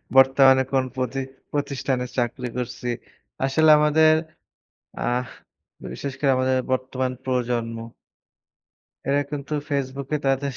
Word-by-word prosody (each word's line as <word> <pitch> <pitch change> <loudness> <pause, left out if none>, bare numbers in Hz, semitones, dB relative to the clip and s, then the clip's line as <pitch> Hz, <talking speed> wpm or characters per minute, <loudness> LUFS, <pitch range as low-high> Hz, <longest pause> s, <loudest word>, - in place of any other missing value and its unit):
বর্তমানে 135 0 +7
কোন 130 -1 +2
পতি 130 +1 -2 0.3
পতিষ্ঠানে 135 -3 -1
চাকরি 125 +1 -1
করছি। 125 0 -4 0.6
আসলে 155 +4 +3
আমাদের, 155 +1 +5 0.9
আহ 125 +1 0 0.7
বিশেষ 140 -2 -5
করে 140 -2 +3
আমাদের 130 0 +2
বর্তমান 130 0 -1
প্রজন্ম 120 -3 -1 1.3
এরা 140 +1 +3
কিন্তু 145 +1 -4 0.2
ফেসবুকে 140 +1 -2
তাদের 135 +1 +1
135 Hz, 100 wpm, -24 LUFS, 125-140 Hz, 1.3 s, বর্তমানে